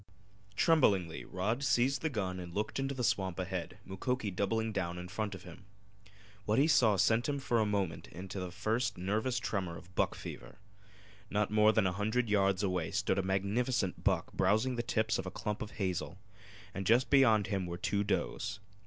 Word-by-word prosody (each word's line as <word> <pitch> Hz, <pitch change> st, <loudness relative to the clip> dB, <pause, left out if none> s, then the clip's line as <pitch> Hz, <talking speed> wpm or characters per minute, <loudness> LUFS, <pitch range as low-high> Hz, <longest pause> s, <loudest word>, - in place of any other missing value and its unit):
Tremblingly 100 Hz, -, +3 dB
Rod 110 Hz, +8 st, -2 dB
seized 130 Hz, +2 st, +2 dB
the 160 Hz, -, 0 dB
gun 95 Hz, -7 st, -3 dB
and 85 Hz, -1 st, -8 dB
looked 105 Hz, +5 st, -2 dB
into 135 Hz, 0 st, -2 dB
the 125 Hz, -, -3 dB
swamp 95 Hz, -5 st, 0 dB
ahead, 95 Hz, 0 st, -4 dB
Mukoki 105 Hz, +3 st, -2 dB
doubling 110 Hz, +4 st, -1 dB
down 90 Hz, -4 st, -2 dB
in 90 Hz, 0 st, -6 dB
front 100 Hz, +1 st, -3 dB
of 90 Hz, -, -11 dB
him. 90 Hz, +2 st, -12 dB, 0.8 s
What 105 Hz, +1 st, +1 dB
he 140 Hz, -, +5 dB
saw 125 Hz, -9 st, +4 dB
sent 115 Hz, +7 st, +2 dB
him 145 Hz, -, 0 dB
for 120 Hz, -4 st, 0 dB
a 110 Hz, -, +2 dB
moment 100 Hz, -5 st, -2 dB
into 95 Hz, +2 st, -7 dB
the 90 Hz, -1 st, -4 dB
first 115 Hz, +5 st, -1 dB
nervous 110 Hz, +7 st, -1 dB
tremor 95 Hz, -7 st, -2 dB
of 90 Hz, +2 st, -15 dB
buck -, -, +1 dB
fever. -, -, -9 dB, 0.7 s
Not 105 Hz, 0 st, 0 dB
more 105 Hz, 0 st, +5 dB
than 110 Hz, -2 st, +2 dB
a 90 Hz, -, +2 dB
hundred 110 Hz, +3 st, 0 dB
yards 100 Hz, -1 st, +2 dB
away 90 Hz, -4 st, 0 dB
stood 95 Hz, -, 0 dB
a -, -, +3 dB
magnificent 100 Hz, +3 st, 0 dB
buck -, -, +1 dB
browsing 110 Hz, +7 st, +2 dB
the 120 Hz, -, 0 dB
tips 110 Hz, -2 st, 0 dB
of -, -, -4 dB
a -, -, -1 dB
clump 105 Hz, +2 st, -4 dB
of 110 Hz, -, -4 dB
hazel, 95 Hz, -3 st, -3 dB, 0.6 s
and 95 Hz, -1 st, -4 dB
just 120 Hz, +3 st, +4 dB
beyond 115 Hz, -7 st, +5 dB
him 95 Hz, -2 st, -2 dB
were 85 Hz, 0 st, -4 dB
two 100 Hz, +3 st, 0 dB
does. 100 Hz, 0 st, -2 dB
105 Hz, 190 wpm, -33 LUFS, 95-115 Hz, 0.8 s, he